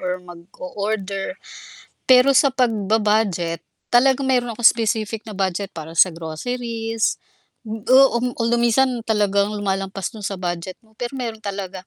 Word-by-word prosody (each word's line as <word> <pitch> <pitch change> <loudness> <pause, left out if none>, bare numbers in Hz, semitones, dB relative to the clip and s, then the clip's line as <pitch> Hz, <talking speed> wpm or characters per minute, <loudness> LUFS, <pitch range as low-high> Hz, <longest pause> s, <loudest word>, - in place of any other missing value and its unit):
or 180 - -3 0.2
mag-o-order. 200 +1 -5 0.8
Pero 255 +1 +7
sa 280 - +4
pagba-budget 210 -6 +1 0.3
talagang 265 +2 +4
meron 245 -2 +1
akong 240 - +4
specific 220 -1 -2
na 225 - -10
budget 190 +1 -2
para 160 -1 -9
sa 185 +2 +5
groceries 225 +7 -3 0.5
o 235 +4 +3
um, 250 +1 -2
kung 230 -1 -1
lu 240 - +2
minsan 240 +3 +3 0.2
talagang 205 -1 +1
lumalampas 195 -1 -3
dun 220 - -10
sa 200 - -3
budget 175 0 -4
mo, 220 -1 -27
pero 245 +2 -4
meron 235 -4 -4
talaga 195 -2 -6
215 Hz, 140 wpm, -21 LUFS, 190-240 Hz, 0.8 s, Pero